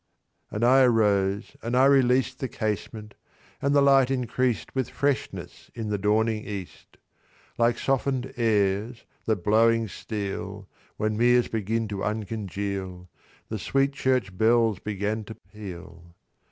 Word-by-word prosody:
And 105 - -3
I 130 +2 +6
arose, 105 -5 +2
and 120 +2 -1
I 130 - +6
released 130 -1 +3
The 130 - -2
casement, 105 -1 -4 0.5
and 140 +1 +1
the 140 - +5
light 135 -2 +5
increased 125 -6 -1
With 130 -2 -1
freshness 140 -1 -3
in 115 -3 -4
the 105 -1 -1
dawning 110 +2 +1
east. 100 -4 -8 0.6
Like 115 0 +3
soften'd 135 -1 -1
airs 110 0 0 0.2
that 105 -6 -1
blowing 115 +2 +3
steal, 100 -1 -5 0.3
When 110 0 -1
meres 120 +1 +4
begin 110 +1 -1
to 100 -2 -4
uncongeal, 100 -4 -4 0.4
The 110 - -4
sweet 135 +6 +1
church 130 -9 0
bells 110 -1 +3
began 105 +2 -3
to 110 - -9
peal. 90 -3 -11
110 Hz, 130 wpm, -26 LUFS, 100-125 Hz, 0.6 s, I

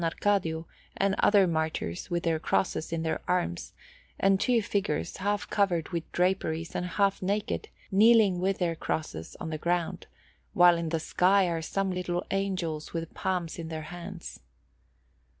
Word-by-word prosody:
Arcadio 165 -2 0 0.3
and 195 0 +2
other 205 -2 +5
martyrs 160 - -2
with 175 -1 -1
their 165 -2 +1
crosses 165 0 0
in 165 -1 -1
their 160 - -1
arms, 85 - -1 0.5
and 195 0 +4
two 245 +3 +3
figures, 200 0 -1
half 205 +1 -1
covered 180 -6 +1
with 170 -2 -4
draperies 175 -3 0
and 180 - -2
half 200 +1 +1
naked, 200 +3 -1 0.2
kneeling 210 -2 +5
with 190 +1 +1
their 170 -2 0
crosses 155 - -4
on 160 - -5
the 155 - -3
ground, 170 0 -1 0.5
while 175 -1 +7
in 170 -1 -2
the 165 0 0
sky 185 +4 +3
are 165 -1 -1
some 195 +4 -1
little 180 -1 -2
angels 185 -6 -2
with 165 -1 -4
palms 180 -4 -2
in 165 - -5
their 160 -1 -5
hands. 175 0 -8
175 Hz, 155 wpm, -28 LUFS, 165-195 Hz, 0.5 s, while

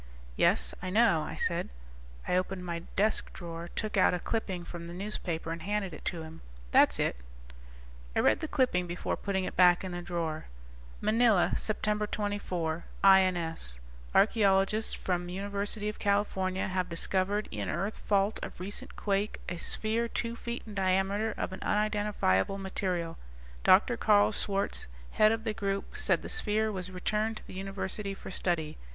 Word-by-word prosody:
"Yes, 60 +1 +3
I 185 - -3
know," 210 -5 +4
I 150 - -5
said. 170 -1 -1 0.6
I - - +2
opened 185 0 -1
my 170 -1 -3 0.2
desk 215 +2 +1
drawer, 170 -1 -7
took 215 -2 -2
out 185 - +5
a - - -2
clipping 190 -4 -2
from 170 -1 -7
the 170 - -7
newspaper, 180 -4 -3
and 165 0 -4
handed 200 -1 -2
it 155 - -9
to 165 -2 -2
him. 160 +1 -10 0.3
"That's - - +5
it." - - +1 1.0
I - - +3
read - - +4
the 315 - -3
clipping 250 -12 +1
before 175 +1 -2
putting 195 -2 -1
it - - -4
back 180 0 +6
in 185 - -4
the 175 0 -4
drawer. 165 -3 -3 0.6
Manila, 220 -3 +4
Sept. 210 -1 -1
24 180 -6 -2 0.2
(INS) 175 - +4 0.4
Archeologists 205 0 +4
from 175 -1 -2
University 200 +2 -3
of 210 - -4
California 195 -2 +1
have 185 -1 -1
discovered 190 +4 0
in 105 -2 -3
earth 195 +7 -2
fault 200 +1 +1
of - - -7
recent 195 +3 -6
quake 200 +1 -1
a 175 - -3
sphere 225 +6 0
two 230 0 -2
feet 235 0 -5
in 215 - -9
diameter 195 +3 +1
of - - -3
an 190 - -6
unidentifiable 205 - +1
material. 185 -4 -3 0.4
Dr. - - +5
Karl 100 +1 +5
Schwartz, 200 - -1 0.2
head 215 0 +5
of 225 0 -1
the 220 -2 -1
group, 195 -2 -3
said - - +1
the - - -5
sphere 220 - 0
was 185 -2 -5
returned 215 +4 -1
to - - -11
the - - -10
University 195 +1 -4
for - - -9
study. 165 -4 -1
195 Hz, 165 wpm, -30 LUFS, 175-210 Hz, 1.0 s, back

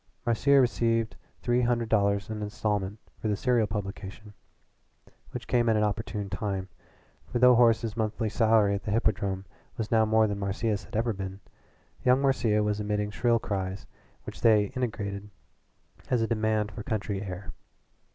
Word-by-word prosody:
Marcia 130 +4 +4
received 115 -3 +1 0.3
three 120 0 +2
hundred 120 -1 +1
dollars 100 -3 +2
an 105 -1 -4
instalment 105 -1 -2 0.2
for - - -1
the 105 - +1
serial 120 -1 +2
publication, 105 +1 -6 1.0
which - - -7
came 120 -2 +2
at 110 - +3
an 105 - +2
opportune 105 -1 -2
time, 95 -2 -3 0.6
for - - 0
though 125 +1 +7
Horace's 115 -2 +3
monthly 110 0 -1
salary 110 -2 +3
at 100 - -2
the - - -6
Hippodrome 100 -3 0 0.3
was 110 -2 -3
now 110 -1 +5
more 110 0 +4
than 100 -1 -2
Marcia's 100 0 -1
had - - -11
ever 115 +1 +1
been, 95 0 -6 0.6
young 125 +1 +4
Marcia 115 -6 +2
was 105 0 0
emitting 105 0 -1
shrill 115 +2 +2
cries 95 -3 -3 0.4
which - - -9
they 110 -1 +4
interpreted 105 -5 -3 0.8
as 120 -3 +2
a - - 0
demand 110 -2 0
for 105 - -7
country 105 -2 -2
air. 95 -1 -6
110 Hz, 160 wpm, -28 LUFS, 100-115 Hz, 1.0 s, though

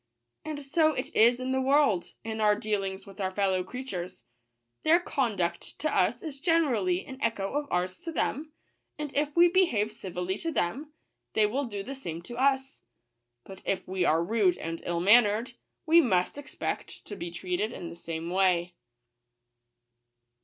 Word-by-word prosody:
And 300 -2 -6
so 310 +2 +3
it 255 - -5
is 240 +3 +5
in 255 0 -2
the 265 0 +1
world, 270 -9 +2
in 220 0 -4
our 210 -1 +5
dealings 200 -3 -2
with 200 0 -10
our 190 - 0
fellow 190 -1 0
creatures. 190 -5 -6 0.6
Their 325 +2 +5
conduct 205 - -2
to 310 - -1
us - - +2
is 295 -4 -6
ge 280 - -7
nerally 235 - +2
an 265 0 -9
echo 205 -4 -1
of 290 0 -1
ours 180 +1 -1
to 330 - -6
them; 310 -1 -2 0.5
and 295 -2 -5
if 290 0 0
we 345 +1 +7
behave 330 - +2
civilly 185 0 -4
to 330 - -2
them, 285 - -2 0.4
they 215 - +4
will 265 +7 -1
do 205 -4 -5
the 270 - -6
same 170 -11 -6
to 240 - -9
us. 265 +1 +1 0.6
But 190 +6 -11
if 195 - -2
we 185 0 -1
are 165 0 +3
rude 205 -2 +2
and 165 0 -5
ill 170 -1 -1
mannered, 215 +3 +4 0.3
we 335 +1 +7
must 185 - +1
expect 290 0 -5
to 205 - -7
be 175 -3 -5
treated 180 +5 -2
in 175 -7 -7
the 170 - -9
same 165 0 -5
way." 180 -2 +2
215 Hz, 175 wpm, -28 LUFS, 185-275 Hz, 0.6 s, we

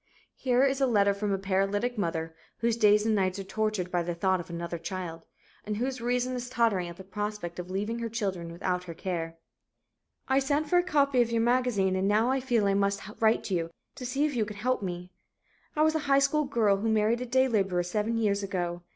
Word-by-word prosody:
Here 255 0 +2
is 275 0 +1
a 270 - +4
letter 200 -4 +3
from 200 +1 -2
a 195 - +1
paralytic 195 +5 0
mother, 165 -5 -2 0.2
whose 230 -1 +1
days 210 -2 +4
and 225 - +2
nights 190 -2 +1
are 195 - -4
tortured 210 -2 -2
by 175 -2 +1
the 170 0 -3
thought 185 +2 +1
of 175 - -8
another 170 0 -4
child, 165 -1 -6 0.4
and 210 0 -3
whose 255 +1 -2
reason 250 +1 0
is 245 0 -4
tottering 225 -8 +1
at 170 - -10
the 190 - -9
prospect 200 -2 -5
of 180 0 -6
leaving 210 +5 -2
her 230 -1 -3
children 190 -7 -3
without 180 +1 -2
her 170 -2 -7
care: 165 -2 -4 0.9
"I 265 +1 +3
sent 285 +3 0
for 355 +3 +4
a - - +2
copy 280 -7 +3
of 235 -1 0
your 230 -1 +2
magazine 240 -6 +2
and 190 +1 +1
now 230 +6 +2
feel 240 -5 +1
I 200 - +3
must 200 0 +1 0.2
write 220 -2 +2
you 165 -3 0 0.2
to - - -9
see 270 +4 0
if 295 -3 -2
you 230 - +2
can 210 -1 -7
help 250 +3 0
me. 180 -1 -5 0.6
"I 305 - +3
was 315 0 +3
a 315 - +1
high 275 - +6
school 280 +2 +2
girl 225 -7 +2
who 220 +3 -1
married 220 +2 +2
a 250 - -4
day 260 +2 +3
laborer 195 -6 +1
seven 210 +6 -1
years 205 -3 +1
ago. 175 -3 -3
210 Hz, 225 wpm, -28 LUFS, 185-245 Hz, 0.9 s, high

